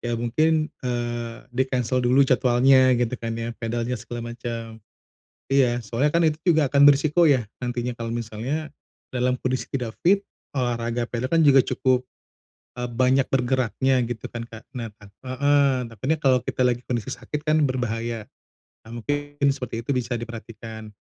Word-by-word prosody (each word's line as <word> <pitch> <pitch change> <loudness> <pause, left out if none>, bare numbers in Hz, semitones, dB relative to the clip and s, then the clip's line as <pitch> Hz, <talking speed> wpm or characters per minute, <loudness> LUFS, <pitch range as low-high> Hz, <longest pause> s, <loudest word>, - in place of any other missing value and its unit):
ya 120 -1 -2
mungkin, 155 +7 +1
eee, 120 -2 -3 0.2
di-cancel 130 -1 0
dulu 125 +3 +4
jadwalnya 130 0 +4
gitu 120 +1 0
kan 115 -1 -3
ya, 115 0 -3
padelnya 120 +1 -2
segala 120 +1 -6
macem. 115 -1 -6 0.7
Iya, 120 -3 +3
soalnya 125 +7 +1
kan 170 +2 +2
itu 155 0 +1 0.2
juga 155 -2 +4
akan 140 0 +4
beresiko 155 +4 +5
ya 125 -5 +3 0.2
nantinya 120 0 -2
kalau 115 -1 -5
misalnya 120 +7 -4 0.4
dalam 125 0 +1
kondisi 130 0 -2
tidak 125 -5 -3
fit 200 +3 +4 0.3
olahraga 120 -1 -1
padel 120 +2 -3
kan 165 -1 +3
juga 135 -1 +7
cukup, 130 0 +1 0.8
eee, 125 - -2
banyak 130 +2 +2
bergeraknya 130 0 +1
gitu 115 -3 -5
kan, 120 -1 -4
Kak. 115 +1 -11
Nah 120 -2 -4 0.4
heeh, 140 0 +3
takutnya 130 +8 -2
kalau 130 -3 +3
kita 125 - -1
lagi 120 -1 +1
kondisi 120 -4 -2
sakit 145 +4 -6
kan 155 0 +3
berbahaya. 115 -3 -3 0.6
Nah, 120 +1 -8
mungkin 145 +2 -1
seperti 125 -4 -2
itu 125 - -6
bisa 125 0 -2
diperhatikan. 115 -2 -8
125 Hz, 155 wpm, -24 LUFS, 115-135 Hz, 0.8 s, juga